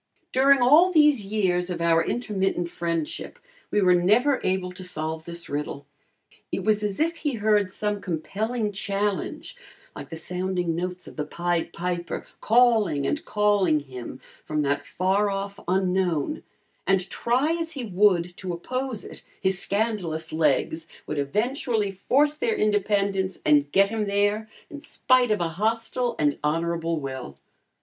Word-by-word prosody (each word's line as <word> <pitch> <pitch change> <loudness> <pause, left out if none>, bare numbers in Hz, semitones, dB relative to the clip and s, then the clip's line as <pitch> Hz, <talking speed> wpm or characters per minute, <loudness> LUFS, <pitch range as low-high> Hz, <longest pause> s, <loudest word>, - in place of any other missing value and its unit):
During 270 0 +5
all 315 +9 +6
these 300 - +5
years 185 -4 0
of 175 -2 -3
our 165 0 +3
intermittent 195 -6 -1
friendship, 165 -2 -3 0.3
we 210 - +1
were 180 -1 +5
never 220 +11 +3
able 185 -1 0
to 185 +1 -9
solve 160 -2 -4
this 170 0 -6
riddle. 145 -1 -4 0.7
It - - -2
was 215 -1 +2
as 205 -2 -2
if 335 +2 +1
he 295 -3 -2
heard 210 -3 +2
some 210 0 -2
compelling 210 +6 -2
challenge, 200 -2 -2 0.4
like - - -8
the 165 - -6
sounding 180 0 -2
notes 180 +1 -4
of - - -12
the 150 - -1
Pied 170 +2 -2
Piper, 175 0 -3
calling 220 - +3
and 295 - -1
calling 205 -7 +2
him 130 -2 -8 0.2
from 150 -1 -1
that 145 0 0
far 195 +5 +1
off 195 0 -4
unknown, 185 - 0 0.5
and 195 -1 +2
try 255 +6 +1
as 330 0 -4
he 270 - -5
would 185 -4 +2
to 185 -2 -4
oppose 255 +6 -4
it, - - -10 0.2
his 190 0 +1
scandalous 195 -8 -2
legs 160 +1 +1 0.2
would 150 - -3
eventually 220 - 0
force 280 +10 +2
their 450 +6 0
independence 200 -2 +1
and 145 -1 +4
get 195 +4 +4
him 220 -1 -2
there 205 +2 +1 0.2
in 295 -3 -9
spite 255 -3 +2
of 210 -3 +1
a 170 - 0
hostile 230 +6 -1
and 145 -1 +1
honorable 165 +1 0
will. 130 - -6
190 Hz, 150 wpm, -25 LUFS, 170-220 Hz, 0.7 s, all